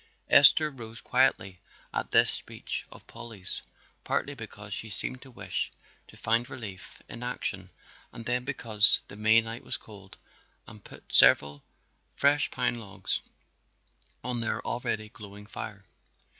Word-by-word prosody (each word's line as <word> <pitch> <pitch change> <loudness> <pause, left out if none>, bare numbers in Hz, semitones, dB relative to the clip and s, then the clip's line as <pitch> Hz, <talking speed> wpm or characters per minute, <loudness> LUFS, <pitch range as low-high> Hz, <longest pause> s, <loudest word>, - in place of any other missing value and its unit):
Esther 155 -1 +7
rose 115 -3 -9
quietly 100 -8 +2 0.3
at - - -2
this - - +4
speech - - -6
of - - -14
Polly's, 115 -5 -7 0.4
partly 145 - -1
because 105 -4 -8
she 110 - -4
seemed 125 +5 0
to 135 - -12
wish 125 - -3 0.4
to - - -16
find 115 +3 +3
relief 110 -9 -9
in 120 - -9
action 100 -6 -3 0.4
and 115 - -9
then 125 +1 0
because 115 -6 +4
the - - -9
May 110 +2 +5
night 115 +1 -7
was - - -3
cold, 100 -3 -14 0.5
and 105 - -12
put - - -14
several 70 0 +6 0.5
fresh 145 +1 +3
pine 120 - -1
logs 100 -3 -3 1.0
on 125 -1 +2
their 115 - -1
already 110 -2 -2
glowing 105 -1 -11
fire. 105 -1 -7
110 Hz, 140 wpm, -29 LUFS, 100-125 Hz, 1.0 s, Esther